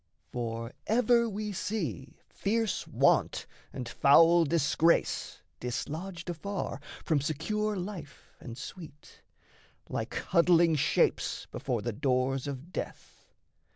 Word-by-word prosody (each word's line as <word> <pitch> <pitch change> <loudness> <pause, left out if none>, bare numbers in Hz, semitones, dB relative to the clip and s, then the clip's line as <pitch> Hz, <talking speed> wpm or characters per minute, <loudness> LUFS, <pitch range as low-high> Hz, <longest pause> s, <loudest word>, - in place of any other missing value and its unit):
For 115 -1 -4 0.2
ever 235 +1 +3
we 210 0 -4
see 185 - -4
fierce 220 0 -1
Want - - +2 0.3
and 125 - -5
foul 165 +7 +6
Disgrace 165 +1 +1 0.2
Dislodged 170 +9 -4
afar 175 -1 -4 0.3
from 155 -4 +2
secure 210 +9 -1
life 180 -7 -7
and 115 -1 -8
sweet, 150 -1 -10 0.7
Like - - -3
huddling 170 -2 +4
Shapes 145 0 +1
before 125 -6 -2
the 120 - -2
doors 130 +3 0
of 140 +6 -7
death. - - -7
165 Hz, 105 wpm, -30 LUFS, 135-195 Hz, 0.7 s, foul